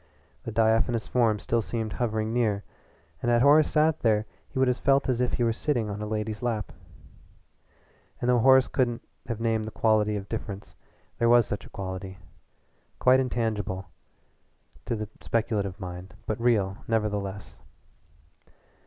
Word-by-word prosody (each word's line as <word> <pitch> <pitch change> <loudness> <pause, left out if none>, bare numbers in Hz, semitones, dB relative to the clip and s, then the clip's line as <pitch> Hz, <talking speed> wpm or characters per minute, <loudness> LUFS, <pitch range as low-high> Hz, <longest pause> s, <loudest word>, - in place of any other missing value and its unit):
The 115 - -4
diaphanous 110 +1 +2
form 115 -4 +2
still 115 +3 0
seemed 110 -1 -3
hovering 110 -2 -1
near, 110 -4 +1 0.6
and 120 - 0
had 120 0 +4
Horace 145 +2 +6
sat 155 0 +2
there 110 -2 +2 0.2
he - - -8
would 130 0 +3
have 125 0 +1
felt 140 0 +3
as 125 -2 +1
if 125 - 0
he 120 - +1
were 115 -1 +2
sitting 120 -4 -1
on 100 +1 -5
a 105 - -3
lady's 105 0 -3
lap. 115 -4 -2 1.5
And 120 - -2
though 125 -1 +4
Horace 130 +2 +6
couldn't 120 -3 -1 0.2
have 115 -2 -3
named 115 -1 0
the - - -4
quality 105 -1 +2
of 100 -1 -5
difference, 100 -2 -6 0.4
there 115 - +3
was 120 -1 +6
such 100 -2 -5
a - - -17
quality 95 0 -6 0.8
quite 130 +1 +5
intangible 105 -7 -2 1.0
to 120 - -1
the 110 -1 -4
speculative 105 -4 -1
mind, 90 0 -8
but 110 +1 -3
real, 105 -5 +2
nevertheless. 105 -3 -2
110 Hz, 155 wpm, -27 LUFS, 105-120 Hz, 1.5 s, Horace